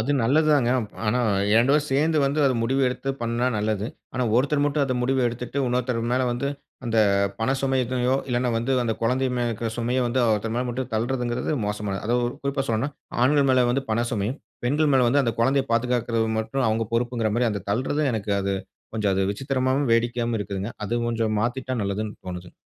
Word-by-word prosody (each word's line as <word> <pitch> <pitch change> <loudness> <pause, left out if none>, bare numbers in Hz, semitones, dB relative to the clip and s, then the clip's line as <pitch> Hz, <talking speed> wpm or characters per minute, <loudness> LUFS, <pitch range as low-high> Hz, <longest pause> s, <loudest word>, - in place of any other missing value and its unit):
அது 120 +6 -1
நல்லது 155 +6 +3
தாங்க. 125 -4 +2 0.4
ஆனா 120 +4 +2 0.4
2 130 +4 +4
பேரும் 150 0 +2
சேர்ந்து 155 +3 +2
வந்து 140 +2 0
அத 130 - +3
முடிவு 135 +4 +1
எடுத்து 125 +2 -5
பண்ணா 115 +2 0
நல்லது. 105 0 -1 0.3
ஆனா, 130 - 0
ஒருத்தர் 145 +3 +2
மட்டும் 145 0 +1
அத 130 - -1
முடிவு 130 +1 +1
எடுத்துட்டு, 125 +3 -5
இன்னொருத்தர் 125 -1 0
மேல 130 +1 +2
வந்து 130 +3 -2 0.4
அந்த 115 -1 0 0.4
பண 115 - +1
சுமை 135 -1 +1
இதயோ 125 +1 0
இல்லைனா 125 0 0
வந்து 120 +4 0
அந்த 115 -2 0
குழந்தை 130 +3 +1
மேலே 120 - 0
இருக்கிற 115 0 -3
சுமைய 120 +2 0
வந்து 125 +2 0
ஒருத்தர் 110 +2 -1
மேல 125 - 0
மட்டும் 130 +1 -4
தள்றதுங்குறது 120 +1 -1
மோசமானது. 105 -1 -3
அதா, 120 - +1 0.3
குறிப்பா 140 0 0
சொல்லணும்னா, 115 +6 0 0.3
ஆண்கள் 140 +1 +4
மேல 130 -1 +4
வந்து 135 +2 0
பண 115 +2 +1
சுமையும், 110 +6 -2 0.3
பெண்கள் 150 +3 +2
மேல 125 -2 +4
வந்து, 140 +3 +3
அந்த 115 -3 -1
குழந்தைய 135 +2 +3
பாதுகாக்குறது 120 -1 +1
மட்டும் 110 +3 -1
அவங்க 110 0 0
பொறுப்புங்கிற 115 -2 0
மாரியும், 120 -2 +1
அந்த 100 -3 -4
தள்றது 130 +8 0
எனக்கு 105 -2 -2
அது 100 0 -1 0.4
கொஞ்சம் 105 -3 +1
அது 95 - +1
விசித்திரமாவும், 130 +3 0
வேடிக்கையாவும் 120 0 +1
இருக்குதுங்க. 100 +2 -4
அது 120 +3 -1
கொஞ்சம் 115 -2 0
மாத்திட்டா 130 +2 -2
நல்லதுன்னு 105 +2 -3
தோணுது. 90 -1 -7
120 Hz, 190 wpm, -24 LUFS, 115-130 Hz, 0.4 s, 2